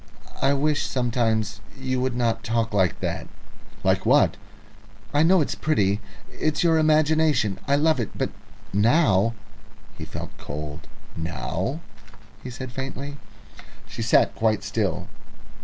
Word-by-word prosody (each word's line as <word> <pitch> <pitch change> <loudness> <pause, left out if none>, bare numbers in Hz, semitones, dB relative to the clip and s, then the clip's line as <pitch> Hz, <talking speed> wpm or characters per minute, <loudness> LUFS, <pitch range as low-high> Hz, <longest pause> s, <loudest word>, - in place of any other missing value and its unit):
"I 135 +1 +4
wish 150 +1 +1
sometimes 115 -4 0 0.2
you 130 -1 -1
would 130 -1 -1
not 115 -2 0
talk 115 0 0
like 95 -4 +1
that." - - -3 0.6
"Like - - +2
what?" - - +4 0.8
"I 145 - +4
know 175 +2 +5
it's 145 - -1
pretty 105 -9 +1 0.3
it's 155 +1 0
your 165 -2 +4
imagination. 155 -8 +3
I 140 - +4
love 155 0 +3
it, 115 - -1
but - - -1 0.4
now 115 - +3 0.3
" - - -25
He - - -5
felt - - -7
cold. 75 0 -6 0.3
"Now?" 90 - -3 0.6
he 125 - -7
said 125 +1 -7
faintly. 135 +2 -5 0.7
She 115 +2 -7
sat 115 - +4
quite 110 -2 +1
still. 100 -2 -1
120 Hz, 135 wpm, -24 LUFS, 105-145 Hz, 0.8 s, know